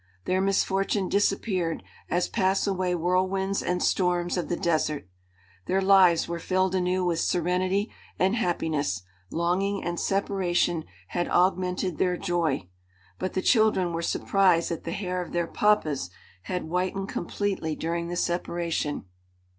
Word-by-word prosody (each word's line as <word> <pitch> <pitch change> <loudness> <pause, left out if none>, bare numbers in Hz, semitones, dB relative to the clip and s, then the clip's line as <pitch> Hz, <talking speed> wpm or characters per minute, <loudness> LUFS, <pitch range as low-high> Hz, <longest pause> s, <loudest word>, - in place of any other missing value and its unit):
Their 185 +1 +1
misfortune 195 0 +1
disappeared 195 -4 0 0.3
as 175 +1 +1
pass 190 0 +1
away 185 -2 0
whirlwinds 185 +3 0
and 180 0 -1
storms 175 -1 +1
of 180 - -2
the 175 - +1
desert. 155 - 0 0.6
Their 190 - +2
lives 190 -3 +5
were 170 0 -3
filled 185 +2 +1
anew 185 0 +1
with 170 -2 +1
serenity 185 +4 0 0.3
and 190 +4 +2
happiness; 155 - -1 0.3
longing 190 +4 0
and 175 0 -2
separation 180 -4 0 0.2
had 175 - -1
augmented 180 -1 +1
their 180 -1 +2
joy. 165 - -1 0.5
But 185 - -2
the 185 - -1
children 215 -7 +3
were 165 - -2
surprised 180 -1 +2
that 165 - -4
the 165 - -3
hair 185 -1 -2
of 175 - -8
their 175 -1 +1
"papas" 155 - +1 0.4
had 180 -1 -1
whitened 185 +4 -2
completely 175 -3 -2
during 170 +2 -2
the 175 - -4
separation. 170 - -1
180 Hz, 140 wpm, -27 LUFS, 170-190 Hz, 0.6 s, lives